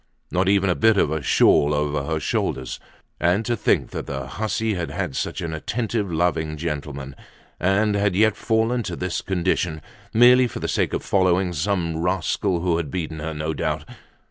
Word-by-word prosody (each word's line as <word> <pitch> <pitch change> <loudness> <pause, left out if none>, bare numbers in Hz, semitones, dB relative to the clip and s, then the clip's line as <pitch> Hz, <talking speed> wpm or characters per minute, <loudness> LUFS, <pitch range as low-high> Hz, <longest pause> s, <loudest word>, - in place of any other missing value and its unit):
Not 95 +1 +2
even 100 -1 +3
a 90 - +3
bit 110 -2 +4
of 75 - +2
a 80 -1 -1
shawl 75 +1 +4
over 75 -1 -1
her 80 - 0
shoulders. 70 - -2 0.4
And 90 +6 +2
to 120 - 0
think - - +1
that - - -5
the 65 -1 -4
hussy 110 +8 -2
had 85 -3 -3
had 65 - -3
such - - -3
an 80 -1 -4
attentive, 105 +4 -2
loving 80 -2 0
gentleman, 70 -4 -5 0.4
and 105 +4 +2
had 100 -2 +1
yet 110 +1 +4
fallen 115 +2 +1
to 95 -6 -4
this 90 +1 -3
condition, 90 -3 -1 0.3
merely 125 +2 +6
for - - -7
the - - -3
sake - - 0
of - - -2
following 95 -1 +2
some 85 0 -1
rascal 90 0 0
who 85 -2 +1
had 80 -4 -3
beaten 80 -1 -4
her, 80 +1 -4
no 75 +1 -2
doubt! 75 -2 -2
90 Hz, 185 wpm, -23 LUFS, 80-100 Hz, 0.4 s, merely